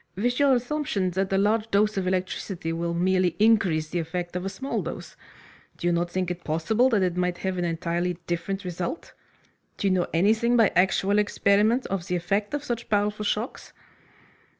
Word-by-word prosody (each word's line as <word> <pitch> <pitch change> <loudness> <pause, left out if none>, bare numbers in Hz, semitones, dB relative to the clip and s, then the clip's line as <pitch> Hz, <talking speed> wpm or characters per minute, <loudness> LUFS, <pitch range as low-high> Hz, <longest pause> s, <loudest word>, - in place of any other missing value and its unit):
"With 245 +7 0
your 280 -2 +5
assumption 245 -7 -1
that 190 +2 -1
a 195 - +2
large 215 +3 +1
dose 210 +1 +2
of 190 -2 -1
electricity 185 -2 -2
will 170 +1 -2
merely 185 0 +2
increase 195 -8 +3
the 175 - -2
effect 175 +2 -4
of 180 - -2
a 195 - -2
small 265 +8 -3
dose. - - -7 0.6
Do - - -6
you 175 - +3
not 170 +1 0
think 185 0 -2
it 180 0 -6
possible 185 +11 +2
that 215 -6 +2
it 180 -2 0
might 180 -1 0
have 190 -1 -3
an 175 - 0
entirely 170 +1 -1
different 185 +3 -3
result? 180 - -5 0.6
Do - - -3
you 195 - +3
know 180 -1 +1
anything, 220 +7 +3
by 225 -3 +5
actual 190 +3 +3
experiment, 210 +4 +2
of 190 -3 -3
the 180 - -1
effect 200 +7 -1
of 290 - -4
such 240 -4 -4
powerful 210 0 0
shocks?" 215 +4 -3
190 Hz, 190 wpm, -25 LUFS, 175-215 Hz, 0.6 s, your